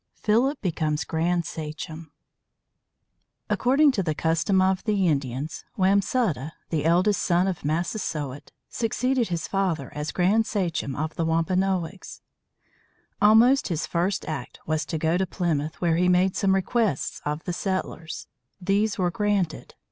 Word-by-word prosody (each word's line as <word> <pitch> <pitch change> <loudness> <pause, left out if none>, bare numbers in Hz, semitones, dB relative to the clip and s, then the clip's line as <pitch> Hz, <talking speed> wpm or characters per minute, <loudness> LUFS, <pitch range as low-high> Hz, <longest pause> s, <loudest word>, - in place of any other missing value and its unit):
PHILIP 245 +7 +2
BECOMES 155 -4 0
GRAND 170 +1 0
SACHEM 155 0 -7 1.4
According 275 +4 +4
to 210 - -1
the 155 -4 -1
custom 165 +4 +1
of 190 0 +2
the 205 -4 +2
Indians, 140 -1 -2
Wamsutta, 190 - +1 0.2
the 155 -3 0
eldest 180 +4 +3
son 175 0 +2
of 185 -4 -3
Massasoit, 150 - -3 0.2
succeeded 245 +1 0
his 170 -2 -3
father 195 -5 -1
as 150 +1 -3
grand 205 +5 +2
sachem 170 -10 -2
of 155 +2 -3
the 165 - -2
Wampanoags. 180 +2 -1 1.0
Almost 225 +6 +6
his 165 -4 -2
first 180 +3 -1
act 140 -6 -5
was 155 0 -1
to 160 - -2
go 160 +2 +1
to 190 - 0
Plymouth, 160 -4 -2
where 165 -2 +2
he 180 +1 +3
made 180 +1 +3
some 195 -1 +2
requests 195 - 0
of 150 +2 -3
the 180 - -3
settlers. 180 -4 -3 0.3
These 200 +3 +1
were 180 -2 +1
granted. 200 -5 -1
180 Hz, 140 wpm, -25 LUFS, 160-200 Hz, 1.4 s, Almost